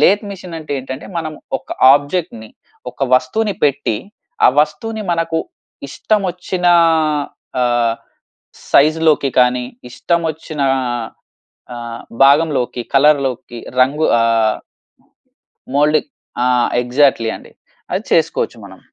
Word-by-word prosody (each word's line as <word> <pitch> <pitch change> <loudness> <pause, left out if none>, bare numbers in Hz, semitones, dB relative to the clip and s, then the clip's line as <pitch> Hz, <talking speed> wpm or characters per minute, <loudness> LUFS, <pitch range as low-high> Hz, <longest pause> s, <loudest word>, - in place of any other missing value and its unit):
Lathe 200 +8 +4
machine 180 -4 -8
అంటే 155 -2 -7
ఏంటంటే 130 +1 -7
మనం 160 -1 -4 0.3
ఒక 130 - -28 0.2
ఆబ్జెక్ట్‌ని 145 -5 -1 0.4
ఒక - - -29
వస్తువుని 200 +12 0
పెట్టి, 140 -6 0 0.5
ఆ - - +7
వస్తువుని 215 +9 -2
మనకు 165 -1 -1 0.5
ఇష్టం 215 +9 0
వచ్చిన 180 0 -4 0.9
ఆహ్, 120 -2 +1 0.8
సైజ్‌లోకి 155 -1 +3
కానీ, 125 0 +3 0.3
ఇష్టం 170 +7 -1
వచ్చిన 155 -1 -8 0.2
ఆహ్, 120 -3 -3 0.7
ఆహ్, 120 -1 -7 0.2
భాగంలోకి, 140 -4 +2
కలర్‌లోకి 135 -4 +2 0.2
రంగు 140 +5 +3 0.2
ఆహ్ 115 -1 +2 1.2
మౌల్డ్ 150 +2 +3 0.5
ఆ! - - +1 0.4
ఎగ్జాక్ట్‌లీ 125 -2 +2
అండి. - - -16 0.4
అది - - -1
చేసుకోవచ్చు - - +1
మనం. - - -13
140 Hz, 105 wpm, -17 LUFS, 125-160 Hz, 1.2 s, ఆ